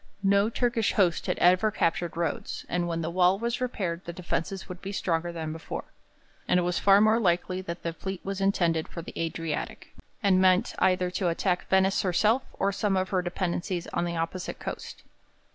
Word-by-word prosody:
No 200 Hz, +2 st, +4 dB
Turkish 235 Hz, -2 st, 0 dB
host 180 Hz, -5 st, +2 dB
had -, -, 0 dB
ever 185 Hz, +4 st, +4 dB
captured 170 Hz, -3 st, -1 dB
Rhodes, 170 Hz, -1 st, -3 dB
and 175 Hz, 0 st, -1 dB
when 165 Hz, -1 st, -2 dB
the 165 Hz, -, -2 dB
wall 180 Hz, +1 st, +4 dB
was 235 Hz, +3 st, -2 dB
repaired 185 Hz, -9 st, -2 dB
the 170 Hz, -, -4 dB
defences 180 Hz, +1 st, -3 dB
would 180 Hz, -1 st, -8 dB
be 195 Hz, -, -5 dB
stronger 175 Hz, -3 st, -1 dB
than 160 Hz, -2 st, -4 dB
before. 160 Hz, -, -6 dB, 0.6 s
And 180 Hz, -, +4 dB
it -, -, +1 dB
was 175 Hz, 0 st, 0 dB
far 200 Hz, 0 st, +6 dB
more 220 Hz, +2 st, +4 dB
likely 185 Hz, -2 st, +1 dB
that 170 Hz, -1 st, -6 dB
the 170 Hz, -, -2 dB
fleet 190 Hz, +2 st, -5 dB
was 195 Hz, 0 st, -3 dB
intended 170 Hz, -5 st, +1 dB
for 170 Hz, -, -7 dB
the -, -, -9 dB
Adriatic, 165 Hz, -1 st, -4 dB, 0.3 s
and 190 Hz, -2 st, +4 dB
meant 185 Hz, 0 st, +4 dB
either 185 Hz, -1 st, +2 dB
to 185 Hz, 0 st, -1 dB
attack 180 Hz, +1 st, 0 dB
Venice 190 Hz, 0 st, +3 dB
herself 210 Hz, +7 st, +2 dB
or 200 Hz, -, 0 dB
some 195 Hz, 0 st, 0 dB
of 185 Hz, 0 st, 0 dB
her 185 Hz, -2 st, +1 dB
dependencies 175 Hz, 0 st, -2 dB
on 175 Hz, -, 0 dB
the 170 Hz, -1 st, -3 dB
opposite 165 Hz, +2 st, -3 dB
coast. -, -, -7 dB
185 Hz, 195 wpm, -27 LUFS, 170-195 Hz, 0.6 s, far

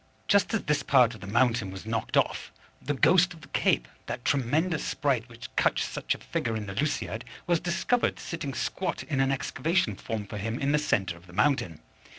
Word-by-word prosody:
Just 200 Hz, -1 st, +4 dB
as 225 Hz, -, -1 dB
this 150 Hz, -1 st, +1 dB
part 125 Hz, -4 st, +4 dB
of 110 Hz, -, -12 dB
the 100 Hz, -, -8 dB
mountain 115 Hz, -1 st, +2 dB
was 95 Hz, +1 st, -8 dB
knocked 115 Hz, 0 st, -1 dB
off, -, -, +1 dB, 0.3 s
the 145 Hz, -, -2 dB
ghost 180 Hz, +5 st, +4 dB
of 160 Hz, -, -15 dB
the -, -, -13 dB
Cape, -, -, +2 dB, 0.2 s
that 125 Hz, -, -5 dB
tremendous 150 Hz, +6 st, +1 dB
sprite 125 Hz, -5 st, 0 dB
which 115 Hz, 0 st, -11 dB
cuts -, -, +2 dB
such -, -, -2 dB
a -, -, -9 dB
figure 115 Hz, -, -2 dB
in 105 Hz, -, -4 dB
the 95 Hz, -, -6 dB
Lusiad, 120 Hz, -1 st, -1 dB, 0.2 s
was 175 Hz, -1 st, +2 dB
discovered 180 Hz, +8 st, 0 dB
sitting 145 Hz, -6 st, -5 dB
squat 180 Hz, +8 st, -2 dB
in 140 Hz, -4 st, -2 dB
an 135 Hz, 0 st, +3 dB
excavation 165 Hz, +7 st, 0 dB
formed 110 Hz, -3 st, -5 dB
for 105 Hz, -, -4 dB
him 110 Hz, +3 st, -2 dB
in 140 Hz, +1 st, 0 dB
the 150 Hz, -, +3 dB
centre 95 Hz, -11 st, 0 dB
of 85 Hz, +2 st, -18 dB
the 90 Hz, -, -14 dB
mountain. 105 Hz, -, +1 dB
130 Hz, 205 wpm, -28 LUFS, 110-160 Hz, 0.3 s, Just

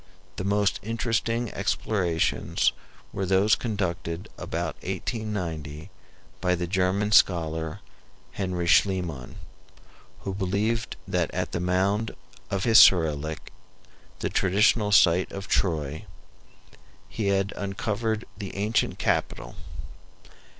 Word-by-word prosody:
The -, -, -3 dB
most 100 Hz, 0 st, +1 dB
interesting 115 Hz, +1 st, -1 dB
explorations 95 Hz, -4 st, 0 dB, 0.4 s
were 95 Hz, -, -2 dB
those 95 Hz, +3 st, +4 dB
conducted 90 Hz, -6 st, -2 dB
about 85 Hz, -1 st, -3 dB
1890 90 Hz, -6 st, -4 dB, 0.5 s
by 90 Hz, -1 st, +2 dB
the 90 Hz, 0 st, -2 dB
German 95 Hz, +3 st, 0 dB
scholar, 80 Hz, -5 st, +2 dB, 0.5 s
Henry 90 Hz, -3 st, -2 dB
Schliemann, 85 Hz, -8 st, +1 dB, 0.9 s
who 95 Hz, -, -4 dB
believed 105 Hz, +4 st, -1 dB
that -, -, 0 dB
at -, -, -2 dB
the -, -, -2 dB
mound 95 Hz, +5 st, 0 dB, 0.3 s
of 95 Hz, -1 st, -1 dB
Hissarlik, 80 Hz, -9 st, +4 dB, 0.7 s
the -, -, 0 dB
traditional 105 Hz, +2 st, +3 dB
site 90 Hz, -3 st, +5 dB
of 100 Hz, 0 st, -6 dB
Troy, 80 Hz, -4 st, -1 dB, 1.0 s
he 105 Hz, -, -3 dB
had 100 Hz, 0 st, +1 dB
uncovered 105 Hz, +3 st, -2 dB
the 100 Hz, -1 st, -7 dB
ancient 105 Hz, +3 st, 0 dB
capital. -, -, -1 dB
95 Hz, 100 wpm, -26 LUFS, 85-105 Hz, 1.0 s, site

